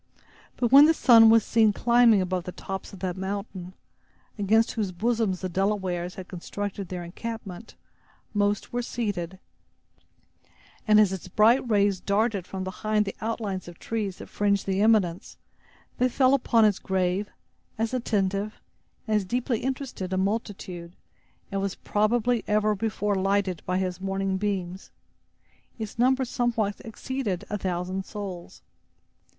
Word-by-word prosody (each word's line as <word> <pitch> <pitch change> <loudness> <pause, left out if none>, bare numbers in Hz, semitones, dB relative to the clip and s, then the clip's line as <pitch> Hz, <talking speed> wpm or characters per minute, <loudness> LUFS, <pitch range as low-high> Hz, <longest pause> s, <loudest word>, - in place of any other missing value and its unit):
But 240 -2 0
when 280 +2 +10
the 325 - +4
sun 230 -5 +7
was 225 -1 +5
seen 220 -2 +3
climbing 235 -3 +4
above 185 -1 -2
the 180 - -5
tops 190 +1 -6
of 195 - -12
that 185 -2 -2
mountain, 190 -1 -5 0.7
against 220 +3 +3
whose 210 -5 -2
bosom 220 +2 0
the 185 +1 -4
Delawares 185 -2 -1
had 185 -1 -8
constructed 200 +1 -5
their 180 -1 -5
encampment, 220 +2 -7 0.6
most 205 +1 0
were 245 - 0
seated; 200 -7 -3 1.5
and 215 0 +6
as 210 -3 +5
his 190 -1 -5
bright 230 +7 +3
rays 200 -3 +2
darted 200 -1 0
from 190 -1 -5
behind 210 +3 -1
the 195 - -5
outline 215 -4 -2
of 175 -1 -10
trees 210 -5 -3
that - - -10
fringed 200 -1 0
the 195 0 0
eminence, 205 -6 +2 0.6
they 255 +1 +3
fell 260 +1 +3
upon 235 -4 +4
as 205 -3 +2
grave, 190 +2 -1 0.5
as 225 +2 -1
attentive, 205 -4 -1 0.5
and 215 -1 +2
as 210 - 0
deeply 240 +3 -1
interested 260 -8 -4
a 185 - 0
multitude, 190 -4 -3 0.6
as 195 - -1
was 195 -1 -2
probably 230 +2 +1
ever 210 0 +2
before 210 0 -1
lighted 195 -2 0
by 185 0 +1
his 185 -1 -2
morning 195 0 -1
beams. 190 -2 -3 0.9
Its 220 -1 -7
number 260 +2 +3
somewhat 230 -4 -1
exceeded 225 -4 -4
a 210 - 0
thousand 185 +1 -2
souls. 190 -4 -8
205 Hz, 145 wpm, -26 LUFS, 185-225 Hz, 1.5 s, when